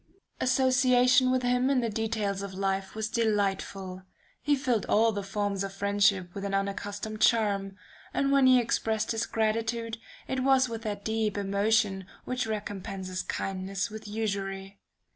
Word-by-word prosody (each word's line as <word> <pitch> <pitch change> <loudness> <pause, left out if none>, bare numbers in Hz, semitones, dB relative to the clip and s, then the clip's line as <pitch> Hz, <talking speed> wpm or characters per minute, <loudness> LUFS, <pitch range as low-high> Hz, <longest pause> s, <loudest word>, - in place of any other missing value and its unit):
"Association 255 0 +4
with 255 0 +1
him 250 +1 +2
in 275 -2 +3
the 235 - 0
details 215 -3 -2
of 200 -1 -6
life 195 0 -2
was 220 0 -2
delightful. 195 -4 -1 0.4
He 295 0 +2
filled 250 -6 0
all 225 +2 +4
the 205 -1 -3
forms 200 0 -2
of 195 0 -5
friendship 200 -2 +1
with 200 - -6
an 200 0 -1
unaccustomed 205 +2 -3
charm, 200 -4 +2 0.3
and 275 0 +1
when 275 -1 +5
he 255 -1 +7
expressed 220 -2 0
his 225 0 -1
gratitude, 225 +1 -1 0.3
it 260 - -1
was 265 0 +4
with 230 -1 -5
that 205 -2 -5
deep 220 -2 0
emotion 200 -1 +1 0.2
which 250 -2 -2
recompenses 195 -3 -4
kindness 195 +2 -3
with 215 0 -8
usury. 195 -2 -3
215 Hz, 150 wpm, -28 LUFS, 195-230 Hz, 0.4 s, he